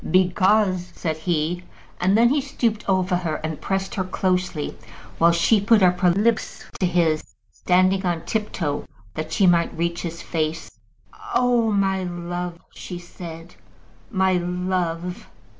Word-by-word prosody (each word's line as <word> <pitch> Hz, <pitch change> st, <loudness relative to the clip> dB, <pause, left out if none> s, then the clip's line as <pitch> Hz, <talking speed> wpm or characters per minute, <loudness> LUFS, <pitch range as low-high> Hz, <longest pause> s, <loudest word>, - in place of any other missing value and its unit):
"Because 185 Hz, +1 st, +3 dB
," -, -, -25 dB
said 160 Hz, -2 st, -2 dB
he; 160 Hz, +1 st, -1 dB, 0.4 s
and 190 Hz, +3 st, +3 dB
then 235 Hz, +1 st, +5 dB
he 285 Hz, +2 st, +2 dB
stooped 235 Hz, -5 st, -1 dB
over 185 Hz, -1 st, +2 dB
her 170 Hz, -3 st, -2 dB
and 155 Hz, -1 st, -4 dB
pressed 195 Hz, 0 st, -2 dB
her 190 Hz, -, -1 dB
closely, 185 Hz, -4 st, -1 dB, 0.4 s
while 170 Hz, +1 st, +6 dB
she 195 Hz, +5 st, +3 dB
put 215 Hz, 0 st, +4 dB
up 180 Hz, 0 st, +4 dB
her 180 Hz, -1 st, +4 dB
lips 215 Hz, +6 st, 0 dB, 0.2 s
to 185 Hz, -, +2 dB
his, 165 Hz, -3 st, +2 dB, 0.3 s
standing 185 Hz, +2 st, +2 dB
on 175 Hz, -3 st, -1 dB
tip 215 Hz, -1 st, -2 dB
toe 145 Hz, -4 st, -2 dB, 0.3 s
that 155 Hz, +6 st, -5 dB
she 195 Hz, +4 st, +3 dB
might 170 Hz, -2 st, +3 dB
reach 170 Hz, +1 st, -1 dB
to -, -, -3 dB
his 170 Hz, +1 st, -8 dB
face. 160 Hz, 0 st, -2 dB, 0.6 s
"Oh, 245 Hz, -4 st, +3 dB
my 195 Hz, -2 st, +1 dB
love!" 175 Hz, 0 st, -4 dB, 0.2 s
she 180 Hz, -, -7 dB
said. 175 Hz, -1 st, -10 dB, 0.6 s
"My 190 Hz, -2 st, +2 dB
love! 180 Hz, +1 st, -2 dB
180 Hz, 155 wpm, -23 LUFS, 170-195 Hz, 0.6 s, while